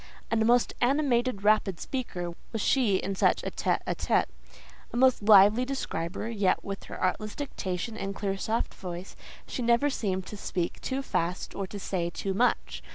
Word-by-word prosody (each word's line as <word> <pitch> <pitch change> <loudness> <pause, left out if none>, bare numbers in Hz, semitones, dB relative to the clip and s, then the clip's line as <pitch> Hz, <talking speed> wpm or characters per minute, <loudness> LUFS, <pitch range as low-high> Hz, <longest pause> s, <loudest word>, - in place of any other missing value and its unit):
A - - +3
most 235 +2 +3
animated, 250 -5 +2
rapid 210 -4 +3
speaker 180 -10 -4 0.2
was 225 - -3
she 225 -2 +3
in 195 +1 -1
such 190 - +2
a - - -3
tête - - 0
à - - 0
tête, - - +2 0.7
a - - -4
most 255 -1 +4
lively 210 +3 +7
describer; 220 -9 -3
yet 205 -5 +1
with 195 0 -6
her - - -8
artless 210 +3 -1
diction 220 -6 -4
and 195 -2 -4
clear 195 -1 -2
soft 220 +4 -1
voice, 180 0 -7 0.3
she - - -5
never 240 +4 +3
seemed 190 -6 -2
to 210 - -8
speak 175 -3 -3
too 270 +1 -2
fast 175 -6 -2
or 195 -1 -4
to 205 - -7
say 175 -3 -2
too 195 +2 -3
much. 245 +6 +1
210 Hz, 175 wpm, -28 LUFS, 190-240 Hz, 0.7 s, lively